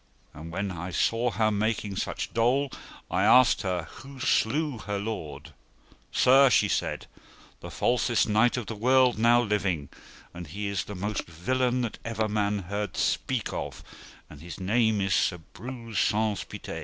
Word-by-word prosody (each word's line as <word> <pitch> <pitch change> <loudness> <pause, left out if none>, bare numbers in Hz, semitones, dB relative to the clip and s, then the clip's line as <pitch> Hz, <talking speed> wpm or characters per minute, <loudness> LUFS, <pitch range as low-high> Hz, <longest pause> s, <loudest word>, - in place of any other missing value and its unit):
And 80 +2 -9
when 95 +3 -3
I 90 0 -5
saw 115 +7 +1
her 110 -1 +1
making 105 -1 -1
such - - -4
dole, 130 +4 +2 0.4
I - - +1
asked 130 -1 +5
her 90 -3 -2
who 135 +9 -12
slew 135 +2 +1
her 105 -1 -4
lord. 100 -7 -6 0.6
Sir, 135 +1 +6
she - - +4
said, - - -2 0.5
the - - -9
falsest 120 -1 +1
knight 110 +4 +3
of 120 - -3
the 115 - -5
world 125 +2 +3
now 120 +1 +5
living, 95 - -1 0.4
and 85 -1 -8
he 100 +7 -5
is 100 -2 -2
the 105 - -7
most 105 +3 -3
villain 125 +9 0
that 115 -3 -4
ever 110 -1 -1
man 105 -1 -1
heard 100 +1 -4
speak - - -1
of - - -5 0.4
and 75 -1 -13
his 85 +3 -9
name 110 +2 +2
is 95 -1 0
Sir 90 - +2 0.2
Breuse 115 -5 -5
Saunce 105 -1 +1
Pité. - - -7
105 Hz, 165 wpm, -27 LUFS, 95-120 Hz, 0.6 s, Sir